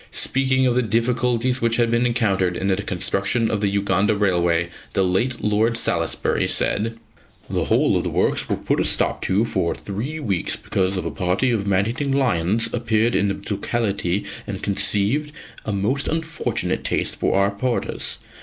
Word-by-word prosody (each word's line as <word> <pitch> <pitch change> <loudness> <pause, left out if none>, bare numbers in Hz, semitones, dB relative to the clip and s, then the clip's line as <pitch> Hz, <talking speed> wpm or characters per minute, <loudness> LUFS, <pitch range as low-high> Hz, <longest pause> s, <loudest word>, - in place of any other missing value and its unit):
Speaking 130 0 +1
of 125 - +3
the 125 - +2
difficulties 120 +2 +1
which 115 0 +2
had 115 -1 +2
been 120 +1 +2
encountered 100 -7 +1
in 95 - -1
the 95 - +3
construction 100 +4 0
of 105 -2 -1
the 105 - +2
Uganda 100 +1 +1
Railway, 85 -4 +1 0.2
the 95 - +2
late 115 +8 0
Lord 110 +2 +2
Salisbury - - +1
said: 115 +2 0 0.5
"The - - -1
whole - - +2
of - - +1
the - - -1
works - - 0
were - - +1
put - - -1
a - - +2
stop - - 0
to 100 +4 +2
for 85 -7 -1
three 120 +11 -5
weeks 100 - -1
because 95 0 -1
a 90 - -2
party 95 - 0
of 105 -4 -1
man 100 0 +2
eating 135 +5 -2
lions 115 -6 +1
appeared 115 -1 +1
in 100 +1 +2
the 100 0 -4
locality 100 -3 -1 0.2
and - - -5
conceived 105 +9 +1 0.3
a 110 - -2
most 105 +8 -1
unfortunate 160 0 -2
taste - - 0
for - - 0
our 100 +1 +3
porters. 120 +5 -2
110 Hz, 175 wpm, -22 LUFS, 100-120 Hz, 0.5 s, of